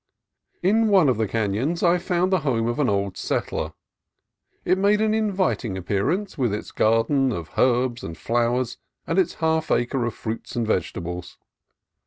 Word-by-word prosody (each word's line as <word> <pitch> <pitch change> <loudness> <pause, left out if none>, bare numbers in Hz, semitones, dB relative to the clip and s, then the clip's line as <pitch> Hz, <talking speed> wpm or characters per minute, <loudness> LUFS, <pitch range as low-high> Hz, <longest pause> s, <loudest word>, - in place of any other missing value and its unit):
In 220 +5 +3
one 190 -8 +5
of 125 - +1
the 110 -1 0
canons 115 - -1
I 175 0 +4
found 180 +1 0
the 185 - +4
home 125 -7 0
of 120 +5 -2
an 145 - +2
old 100 -2 -1
settler. - - -2 0.9
It 185 +1 +2
made 205 +2 +3
an 215 0 +2
inviting 190 - 0
appearance, 105 - -1
with 120 -6 +1
its 105 - -7
garden 125 +5 +2
of 85 -4 -5
herbs 125 -1 +2
and 80 +1 -6
flowers 120 +1 0 0.3
and 165 +3 +1
its 185 - +1
half 160 -1 0
acre 120 +1 +1
of 120 - -3
fruits 110 +1 -6
and 120 -1 0
vegetables. 90 -3 -3
125 Hz, 165 wpm, -24 LUFS, 110-180 Hz, 0.9 s, one